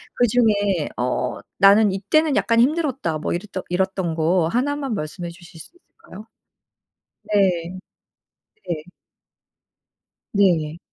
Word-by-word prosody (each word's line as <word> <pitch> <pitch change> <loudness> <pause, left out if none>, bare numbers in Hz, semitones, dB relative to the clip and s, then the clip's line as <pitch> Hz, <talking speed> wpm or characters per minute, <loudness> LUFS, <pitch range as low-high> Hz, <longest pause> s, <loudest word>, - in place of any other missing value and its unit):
그중에 205 -8 +2
어 125 0 -2 0.2
'나는 200 +1 +6
이때는 280 +10 +1
약간 230 0 +2
힘들었다.' 270 - +1
뭐 - - -3
이랬던 185 +1 -5
이랬던 185 -2 -1
거 165 +1 +1
1 265 +6 0
만 275 -4 -3
말씀해 170 0 -5
주실 170 0 -14
수 - - -14
있을까요? 220 - -15 1.1
네. 185 -3 +1 0.9
네. 155 -3 -3 1.5
네. 170 -6 +2
190 Hz, 205 characters per minute, -21 LUFS, 170-230 Hz, 1.5 s, 나는